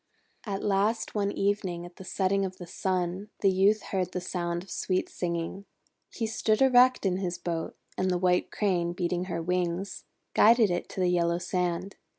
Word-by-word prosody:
At 195 -1 -3
last 210 +3 +1
one 200 -1 0
evening, 195 -4 -1
at 175 0 -13
the - - -9
setting 195 +1 0
of 185 -1 -4
the 175 - -8
Sun, 185 +2 -2
the 195 - +4
Youth 200 +3 +3
heard 185 -2 -1
the - - -1
sound 175 -1 -3
of 190 - -14
sweet 185 +1 -1
singing. 170 +3 -3 0.4
He 230 - -3
stood 220 -1 +1
erect 255 -2 +5
in 185 -1 +2
his 180 -2 -2
boat, 165 -2 -3 0.2
and 185 - +1
the 180 - +1
White 180 0 +2
Crane, 175 -4 0
beating 175 0 -1
her 170 -3 -3
wings, 180 +2 -2 0.3
guided 225 -2 +6
it 175 - -2
to 190 - -4
the 180 - +3
yellow 170 -1 +2
sand. 180 +1 -2
185 Hz, 180 wpm, -28 LUFS, 175-200 Hz, 0.4 s, guided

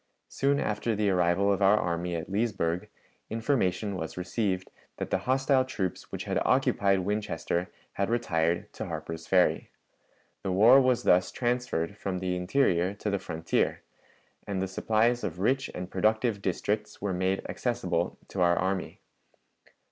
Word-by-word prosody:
Soon 140 +1 +1
after 105 +2 -1
the 105 -1 +1
arrival 90 +2 +3
of 100 - -3
our 100 +2 +5
army 85 -2 -1
at 80 0 -4
Leesburg, 95 -4 -1 0.4
information 110 -4 0
was 80 -2 -5
received 95 0 -2 0.3
that - - -5
the - - +2
hostile 135 0 +3
troops 100 -8 -4
which - - -4
had - - -1
occupied 100 -1 +2
Winchester 90 -3 -2 0.2
had 100 +1 -1
retired 85 -8 0
to - - -5
Harper's 80 0 -6
Ferry. 90 -2 +2 0.7
The 95 - -2
war 115 +8 +7
was 130 -2 +2
thus 90 0 +4
transferred 120 -8 -1
from 95 -2 -2
the 90 0 -2
interior 90 -1 +1
to 105 +1 -3
the 100 - 0
frontier, 80 -1 -1 0.6
and 100 -2 -2
the 95 - -1
supplies 115 +5 +1
of 85 -3 -3
rich 135 +8 +1
and 90 0 -6
productive 110 +2 +1
districts 105 +3 -2
were 100 -1 -2
made 95 +2 -1
accessible - - -1
to 95 - -3
our 85 0 +4
army. 95 0 -2
95 Hz, 150 wpm, -28 LUFS, 90-110 Hz, 0.7 s, war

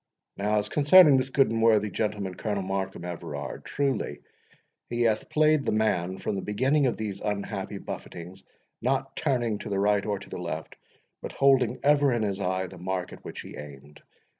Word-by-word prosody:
—Now, 105 +2 0
as 105 0 0
concerning 150 +3 +7
this 130 0 0
good 135 -3 +3
and 115 0 0
worthy 105 -2 +4
gentleman, 105 -2 -2
Colonel 100 +1 -3
Markham 95 -2 -3
Everard, 80 -5 -6
truly 135 - -2 0.7
he 120 0 0
hath 110 -2 +1
played 155 -1 +3
the - - 0
man 95 -4 0
from - - -3
the 95 - -2
beginning 130 +8 +2
of 120 - -1
these 105 -3 -4
unhappy 105 -1 -3
buffetings, 90 +2 -8 0.4
not - - -1
turning 120 -5 0
to - - -7
the 100 - -1
right 100 0 +2
or 105 -1 -1
to 100 - -12
the - - -5
left, 80 -2 -5 0.5
but - - -6
holding 130 -3 +3
ever 145 -1 +4
in 120 -2 0
his 100 -2 -2
eye 95 -1 -1
the 95 0 -11
mark 90 0 -3
at - - -13
which - - -7
he - - -10
aimed. 70 0 -11
105 Hz, 190 wpm, -27 LUFS, 95-125 Hz, 0.7 s, concerning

